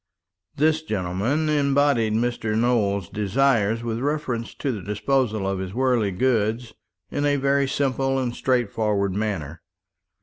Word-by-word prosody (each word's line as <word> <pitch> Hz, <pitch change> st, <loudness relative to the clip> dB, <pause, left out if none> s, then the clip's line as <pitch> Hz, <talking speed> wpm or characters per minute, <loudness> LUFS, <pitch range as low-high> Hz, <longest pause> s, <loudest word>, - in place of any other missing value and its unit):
This 155 Hz, +2 st, +2 dB
gentleman 110 Hz, -, -1 dB
embodied 140 Hz, -6 st, +2 dB
Mr. 115 Hz, -1 st, -1 dB
Nowell's 105 Hz, -6 st, +1 dB
desires 110 Hz, +1 st, +1 dB
with 115 Hz, -1 st, -2 dB
reference 135 Hz, -4 st, -2 dB
to 140 Hz, -, -2 dB
the 105 Hz, -5 st, -5 dB
disposal 110 Hz, +1 st, 0 dB
of 95 Hz, -1 st, -1 dB
his 95 Hz, +1 st, -5 dB
worldly 125 Hz, -5 st, +2 dB
goods 110 Hz, +2 st, 0 dB, 0.4 s
in 145 Hz, -, -1 dB
a 145 Hz, 0 st, +2 dB
very 140 Hz, 0 st, +2 dB
simple 135 Hz, 0 st, 0 dB
and 125 Hz, -2 st, -2 dB
straightforward 105 Hz, -5 st, 0 dB
manner. 95 Hz, -7 st, -3 dB
120 Hz, 130 wpm, -23 LUFS, 105-135 Hz, 0.4 s, This